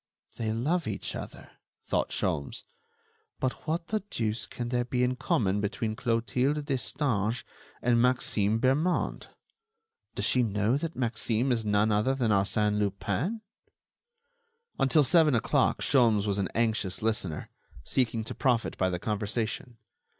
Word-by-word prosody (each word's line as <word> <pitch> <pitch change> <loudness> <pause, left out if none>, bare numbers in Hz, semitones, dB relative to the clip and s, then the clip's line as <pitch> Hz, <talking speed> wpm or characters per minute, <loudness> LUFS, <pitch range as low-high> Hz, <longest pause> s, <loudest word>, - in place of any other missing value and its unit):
"They 110 -1 -1
love 150 +9 0
each 105 - -3
other," - - -8 0.3
thought - - 0
Sholmes, 70 -1 -2 0.8
"but 130 +4 -3
what 165 +2 -2
the 215 - +1
deuce 110 0 -2
can 120 -1 -5
there 120 0 +1
be 125 0 0
in 125 +1 +1
common 105 -6 +1
between 110 +1 -2
Clotilde 125 +5 0
Destange 125 -5 -1 0.4
and 120 -1 +3
Maxime 115 -4 +2
Bermond? 145 +8 +1 0.9
Does - - -1
she 125 - +3
know 105 +1 +1
that 160 +3 -3
Maxime 120 0 0
is 115 -2 +1
none 105 +1 +2
other 105 +6 +2
than 120 -5 +1
Arsène 105 +1 +2
Lupin?" 105 - -1 1.4
Until 140 +3 +4
seven 155 -1 +5
o'clock 115 - +1
Sholmes 115 -6 +3
was 100 -1 0
an 95 - -1
anxious 110 -4 0
listener, 105 -8 -2 0.3
seeking 115 - 0
to - - -6
profit 125 -5 0
by 95 - +2
the 90 - -2
conversation. 110 +4 -2
115 Hz, 135 wpm, -29 LUFS, 105-130 Hz, 1.4 s, seven